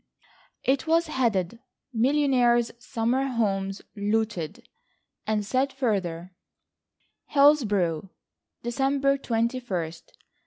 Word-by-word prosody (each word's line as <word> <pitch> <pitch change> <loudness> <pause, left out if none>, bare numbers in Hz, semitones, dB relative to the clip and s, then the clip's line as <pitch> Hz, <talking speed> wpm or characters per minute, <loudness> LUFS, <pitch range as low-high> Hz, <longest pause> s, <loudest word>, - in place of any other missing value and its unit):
It 265 +3 +1
was 330 +1 +3
headed: 230 - 0 0.3
"Millionaires' 245 -2 +3
Summer 240 +2 0
Homes 195 -5 -1
Looted," 210 -5 -2 0.6
and 215 -1 0
said 260 +5 +1
further: 185 -9 -2 0.9
"Hillsborough, 205 - +3 0.5
December 275 +3 +1
21st. 225 -10 -2
235 Hz, 75 wpm, -26 LUFS, 195-270 Hz, 0.9 s, was